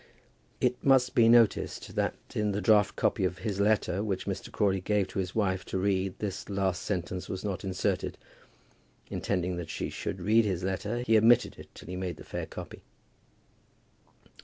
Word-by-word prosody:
It 125 0 0
must 130 -2 +4
be 115 -4 +5
noticed 115 -2 +3
that - - 0 0.2
in 105 -1 0
the 100 - -1
draught 105 -2 +4
copy - - +1
of 90 -1 0
his 100 -3 -3
letter 100 -2 +2
which 100 -3 -2
Mr. 95 -1 -4
Crawley 95 -3 +1
gave 100 0 +1
to 95 - -4
his 90 -1 -3
wife 95 -4 0
to - - -3
read 95 -1 0
this 100 -1 -5
last 95 -2 0
sentence 90 -1 -3
was 95 - -4
not 100 -4 -3
inserted. 95 -2 -1 0.9
Intending 90 -2 -1
that 85 -2 -5
she - - -3
should - - -4
read 110 +3 +4
his 95 -4 -2
letter, 105 +6 -2
he 110 -2 +5
omitted 115 +2 +4
it - - -11
till - - -11
he 90 - -5
made 90 -3 -4
the - - -10
fair - - -5
copy. - - -9
100 Hz, 180 wpm, -29 LUFS, 95-110 Hz, 0.9 s, be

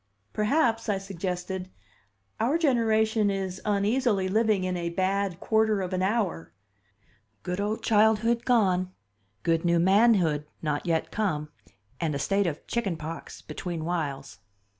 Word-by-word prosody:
"Perhaps," 225 0 +1
I 200 - +2
suggested, 185 -1 -4 0.7
"our 255 +8 +2
generation 220 -7 +2
is 190 -2 -3
uneasily 210 0 +1
living 215 -1 +2
in 185 0 -1
a 170 -1 -2
'bad 190 +1 -1
quarter 220 -1 +2
of 185 0 -4
an 185 - 0
hour' 185 - -1 0.9
good 180 +2 -2
old 210 +2 -2
childhood 220 +2 +3
gone, 185 -7 +2 0.5
good 165 -1 +1
new 170 -1 +3
manhood 185 -5 +3
not 150 +1 -2
yet 165 -1 0
come, 155 -9 -1 0.5
and 160 -4 -1
a - - 0
state 195 +7 +1
of 155 -2 -4
chicken 200 -8 -2
pox 160 +1 -8
between 170 -4 -5
whiles." 145 -9 -3
195 Hz, 135 wpm, -27 LUFS, 170-220 Hz, 0.9 s, childhood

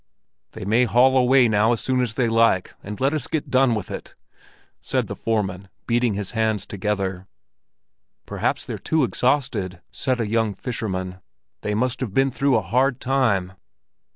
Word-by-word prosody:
"They - - -7
may 115 +5 +3
haul 125 +3 +4
away 130 0 +5
now 110 +2 +3
as 115 - -1
soon 130 -1 0
as 115 -2 -2
they 125 -3 +1
like, 115 -5 +2
and 105 +1 -7
let 135 +3 +1
us 155 - -2
get 155 - -3
done 130 -2 +4
with 105 - -5
it," - - -8 0.6
said - - -1
the - - -6
foreman, 100 -4 -2 0.2
beating 120 -2 +1
his 100 -2 -4
hands 110 -4 0
together. 95 -2 -3 1.0
"Perhaps - - -2
they're - - -5
too 160 -2 +1
exhausted," 120 -8 0
said 130 -2 -1
a 115 - -1
young 110 -1 0
fisherman. 95 -5 -4 0.4
"They 105 - -2
must 125 +3 0
have 115 -7 -4
been 135 0 +3
through 140 +1 +1
a 110 - +1
hard 125 +7 +1
time!" 115 -9 +1
115 Hz, 170 wpm, -23 LUFS, 100-130 Hz, 1.0 s, away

